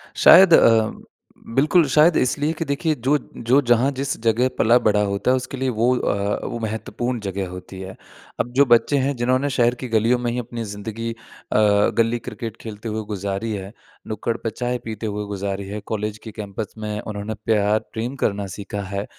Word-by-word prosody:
शायद 185 -3 +8
अ, 110 -5 +5 0.6
बिल्कुल, 155 +5 +4
शायद 155 +4 +5
इसलिए 145 +5 +1
कि 165 0 -4
देखिए 150 +2 0
जो 135 +4 +1 0.2
जो 125 +5 +3
जहाँ 120 +3 +4
जिस 140 0 -3
जगह 115 +2 +2
पला-बढ़ा 110 -2 +4
होता 100 +5 0
है, 130 - +3
उसके 130 +1 -6
लिए 130 0 0
वो 115 0 +1
अ, 100 -3 -1
वो 120 - -4
महत्वपूर्ण 115 +2 -3
जगह 100 -2 -4
होती 90 +1 -9
है। 95 0 -8 0.4
अब 120 - -1
जो 140 - +7
बच्चे 120 +4 +4
हैं 140 +1 0
जिन्होंने 130 +4 +1
शहर 120 -2 +2
की 125 +1 -6
गलियों 115 +3 +3
में 120 -1 -1
ही 125 - -2
अपनी 120 -1 -5
ज़िंदगी 110 +2 -5
अ, - - -8 0.8
गली 115 +1 +2
क्रिकेट 115 0 -7
खेलते 110 0 -7
हुए 110 0 -3
गुज़ारी 100 +3 -3
है, 100 +1 -6 0.3
नुक्कड़ 110 +2 -2
पे 115 - -3
चाय 125 +2 -2
पीते 110 0 -5
हुए 105 0 -3
गुज़ारी 100 -1 -4
है, 105 +2 -5
कॉलेज 105 0 -3
के 110 - -8
कैंपस 105 0 -6
में 105 -1 -4
उन्होंने 105 +1 -5
प्यार 105 -1 +2
प्रेम 120 +4 -3
करना 100 -1 0
सीखा 100 0 -5
है, 100 +1 -2
115 Hz, 190 wpm, -22 LUFS, 105-125 Hz, 0.8 s, शायद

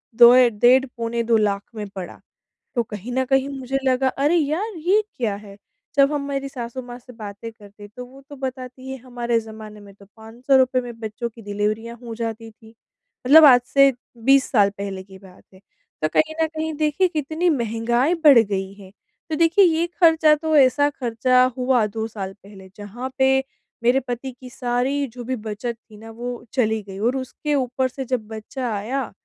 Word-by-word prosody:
2 235 +1 +9
या 255 -1 +7
डेढ़ 245 +5 +4
पौने 235 0 -2
2 230 -1 +3
लाख 200 -2 0
में 210 -2 -5
पड़ा। 190 -2 -8 0.6
तो 240 - +1
कहीं 215 +1 -8
न 260 +1 0
कहीं 270 +1 +1
मुझे 270 -1 -3
लगा 260 0 +2
अरे 285 +5 +1
यार 340 +8 0
ये 365 +7 +2 0.2
क्या 225 -5 -1
है? 200 -1 -12 0.4
जब 275 +1 +4
हम 290 - -1
मेरी 275 -1 -3
सासु 250 -1 -6
माँ 245 0 -9
से 250 0 -15
बातें 215 0 -8
करते 205 -2 -16
हैं, 205 - -11
तो 250 - -6
वो 265 +2 -16
तो 285 - -9
बताती 260 -1 -7
है 265 - -5
हमारे 240 -2 -2
जमाने 220 -1 -11
में 200 -1 -14
तो 200 0 -18
500 235 +5 -1
रूपए 255 -1 +2
में 240 -2 -9
बच्चों 225 +2 -5
की 230 +1 -15
डिलीवरियाँ 210 +3 -3
हो 230 -1 -7
जाती 225 0 -5
थी, 220 0 -19 0.6
मतलब 310 +3 +9
आज 250 -4 +7
से 275 +2 +5 0.3
20 270 0 +5
साल 205 -5 +4
पहले 195 -1 -5
की 190 0 -15
बात 190 -1 -17
है, 190 - -17 0.4
तो 155 - +2
कहीं 315 0 +2
न - - +4
कहीं 315 0 -4
देखिए 305 +5 +1
कितनी 320 +1 -1
महँगाई 235 +2 0
बढ़ 280 -5 +8
गई 195 -3 -1
है। 195 -2 -14 0.4
तो 315 - -1
देखिए, 335 +5 +4
ये 335 0 +1
खर्चा 320 -2 +5
तो 315 +1 -1
ऐसा 285 +1 +4
खर्चा 255 -1 +1
हुआ 250 -3 +2
2 220 +2 -4
साल 195 -4 -6
पहले 195 -2 -14
जहाँ 215 +5 -7
पे 265 0 +4 0.4
मेरे 245 +3 +4
पति 245 +2 -4
की 255 -1 -11
सारी 250 +3 -1
जो 245 0 -10
भी 260 +2 -3
बचत 220 +1 -5
थी 220 -1 -19
ना, 225 +1 -11
वो 240 +1 -7
चली 220 -4 +1
गई 195 -1 -10
और 240 +4 +1
उसके 290 +3 -3
ऊपर 260 0 0
से 265 +1 -7
जब 240 -4 -3
बच्चा 225 +3 -5
आया, 240 +6 -3
245 Hz, 200 wpm, -22 LUFS, 220-270 Hz, 0.6 s, 2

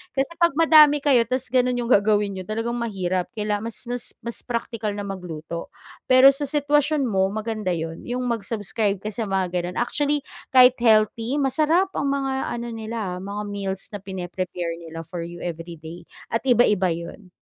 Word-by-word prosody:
kasi 270 +3 0
pag 340 -4 +3
madami 305 -3 +6
kayo 250 -6 +4
ta's 255 +1 -2
ganun 250 -1 +2
yung 240 0 -2
gagawin 205 -1 +3
niyo, 185 -1 -7
talagang 225 +2 -2
mahirap 185 -5 -2
kaila 210 -1 -1
mas 230 +3 -4
mas 245 -1 -2
mas 235 -1 -3
praktikal 230 -3 -3
na 205 - -4
magluto. 170 -4 -6 0.4
Pero 260 +1 +8
sa 280 +1 -3
sitwasyon 295 0 +1
mo, 190 -6 +1
maganda 215 -2 -2
yun, 165 0 -6
yung 250 +1 -2
mag-subscribe 210 -3 -2
ka 215 - -3
sa 220 +1 -3
mga 190 -2 -1
ganon, 180 0 -3
actually, 290 +3 0 0.3
kahit 250 -1 +7
healthy 225 +2 +3
masarap 310 +7 +2
ang 280 - -2
mga 270 -2 -1
ano 235 0 -5
nila, 220 -5 -4
mga 200 +2 -5
meals 195 -1 -3
na 205 - -5
pine-prepare 180 -2 -5
nila 165 -1 -8
for 170 0 -6
you 175 0 -9
every 170 0 -5
day 165 +2 -11 0.2
at 230 - +1
iba-iba 210 -6 +4
yun. 170 +3 -6
215 Hz, 170 wpm, -23 LUFS, 185-255 Hz, 0.4 s, Pero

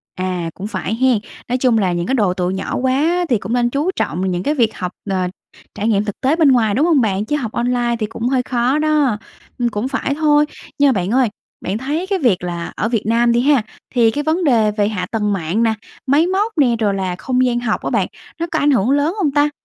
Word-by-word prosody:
À, 185 -2 -2
cũng 195 - -6
phải 205 +1 -3
hén? 255 0 +3 0.3
Nói 250 - 0
chung 250 -3 +2
là 190 -4 +1
những 175 +1 -2
cái - - 0
độ 205 -8 +2
tuổi 180 0 -1
nhỏ 190 - -3
quá 300 +8 +1
thì 240 - +3
cũng 200 +3 -5
nên 240 -1 +2
chú 290 +8 0
trọng 165 - -2
vào - - 0
những 180 0 -2
cái 295 - +1
việc 230 -5 +1
học, 180 -1 -3 0.2
ờ, 185 -2 0 0.5
trải 210 - -2
nghiệm 210 -2 +2
thực 205 - -6
tế 270 +4 +2
bên 315 -4 +4
ngoài, 225 -5 +3
đúng 285 +6 +3
hông 320 -6 +4
bạn? 205 -2 0
Chứ 295 - -1
học 245 -7 -3
online 240 0 0
thì 215 - 0
cũng 225 +2 -4
hơi 260 -1 +2
khó 250 +4 0
đó. 300 -7 +2 0.4
Ừm, 240 -1 +1
cũng 210 +2 -2
phải 275 +1 -1
thôi. 300 -1 +3 0.3
Nhưng 285 -2 +5
bạn 190 -1 -1
ơi, 255 -1 +3 0.3
bạn 190 +3 -2
thấy 295 +9 -3
cái 390 -1 0
việc 225 - +2
là 170 -1 -4
ở 220 - -1
Việt 230 -3 0
Nam 235 +2 +3
đi 235 +1 +3
ha, 280 -1 +4 0.3
thì 230 -2 +4
cái 290 +5 -2
vấn 320 +4 0
đề 230 -8 +3
về 205 -1 0
hạ 205 -4 -2
tầng 210 -2 0
mạng 190 +4 -1
nè, 225 -1 +2 0.3
máy 295 +6 +4
móc 405 +3 -1
nè, 255 -5 +4
rồi 210 -3 +1
là 190 -2 -2
không 255 +6 0
gian 240 -1 +1
học 240 -2 -1
á - - -1
bạn, - - +1 0.3
nó 335 - 0
có - - +1
ảnh 290 - +3
hưởng 240 -3 +2
lớn 290 +4 +2
hông 310 -7 +1
ta? 290 +1 +3
240 Hz, 255 wpm, -18 LUFS, 205-285 Hz, 0.5 s, Nhưng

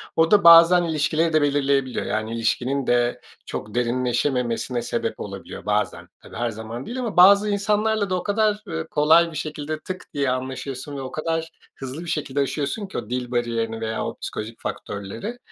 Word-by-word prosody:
O 160 0 +3
da 205 -3 +6
bazen 170 +1 +8
ilişkileri 160 0 0
de 155 - +4
belirleyebiliyor. 140 -2 +1
Yani 110 +1 -2
ilişkinin 125 +4 -1
de 120 0 +1 0.2
çok 105 +1 -6
derinleşememesine 125 0 0
sebep - - -3
olabiliyor - - -8
bazen. - - -1
Tabii - - -13
her 120 0 -1
zaman 110 +3 -7
değil 255 +2 -5
ama 230 -6 -4
bazı 200 +3 +7
insanlarla 210 0 +1
da 185 - +1
o 180 - -2
kadar, 210 0 +1
ııı, 160 -2 -4
kolay 160 +3 +4
bir 155 - -6
şekilde 155 0 -4
tık 185 +3 -7
diye 140 -2 0
anlaşıyorsun 130 +2 -4
ve - - -4
o 130 - -6
kadar 165 +1 -2 0.3
hızlı 135 +4 -7
bir - - -6
şekilde 145 -3 -2
aşıyorsun 145 - -2
ki - - -7
o 110 -3 -5
dil 125 0 -3
bariyerini 115 -2 -1
veya 110 0 -2
o - - -5
psikolojik 115 +2 -6
faktörleri. 105 - -5
145 Hz, 180 wpm, -23 LUFS, 120-170 Hz, 0.3 s, bazen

